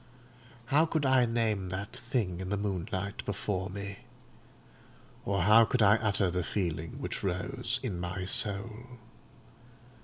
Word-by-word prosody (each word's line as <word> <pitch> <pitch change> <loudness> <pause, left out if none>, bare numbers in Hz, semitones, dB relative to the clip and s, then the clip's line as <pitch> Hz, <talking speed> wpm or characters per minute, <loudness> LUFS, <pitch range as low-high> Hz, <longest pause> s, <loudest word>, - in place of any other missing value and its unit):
How 155 +3 +5
could 155 -3 0
I 130 -2 +4
name 110 -5 0
that 95 +3 -5
thing 115 -8 -2
in 95 0 -4
the 100 - 0
moonlight 100 0 -3
before 95 -2 -2
me? 100 +2 -6 1.3
or 100 -3 +1
how 110 +5 +7
could 115 0 +2
I 105 +2 +6
utter 100 -4 +1
the 90 0 -1
feeling 85 -4 -2
which - - -4
rose 120 +7 -1
in 100 -9 -3
my 90 +1 -3
soul? 110 +6 -1
100 Hz, 140 wpm, -30 LUFS, 95-115 Hz, 1.3 s, how